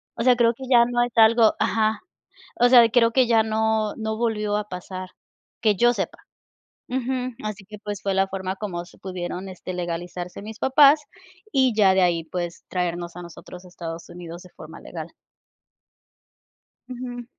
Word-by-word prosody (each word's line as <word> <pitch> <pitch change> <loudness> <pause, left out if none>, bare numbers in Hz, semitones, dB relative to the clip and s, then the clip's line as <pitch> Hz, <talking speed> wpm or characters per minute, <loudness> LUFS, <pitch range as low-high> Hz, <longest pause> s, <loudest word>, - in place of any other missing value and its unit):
O 230 - -2
sea, 250 -1 +5
creo 235 -1 +3
que 265 - -10
ya 240 -2 +7
no 240 0 0
es 245 - -3
algo 225 0 +6
Ajá. 220 0 +1 0.6
O 245 - +6
sea, 240 -2 +8
creo 230 -1 +4
que 255 0 +3
ya 225 -2 +4
no 220 -1 0
no 220 -1 -3
volvió 215 -3 -1
a 210 - -3
pasar, 185 +1 -7 0.5
que 215 -3 +3
yo 240 +4 +4
sepa. - - -4 0.7
Ujú. 255 -1 -2
Así 210 -2 -5
que, 210 +1 -10
pues, 205 -1 -5
fue 195 -1 -1
la 195 0 +2
forma, 190 0 -4
como 175 -5 -4
se - - -18
pudieron, 185 0 -5
este, 185 0 -7
legalizarse 175 +1 -5
mis 220 +2 -9
papás, 285 +2 +6 0.5
y 260 -3 +3
ya 195 -3 +5
de 190 - +3
ahí, 170 -2 +1
pues 175 +1 -5
traernos 175 -1 -3
a 180 - -7
nosotros 175 +1 -11
a 180 - -14
Estados 165 -1 -8
Unidos 175 0 -9
de 180 - -15
forma - - -12
legal. - - -7 1.8
Ujú. 245 -1 -6
210 Hz, 175 wpm, -23 LUFS, 180-235 Hz, 1.8 s, sea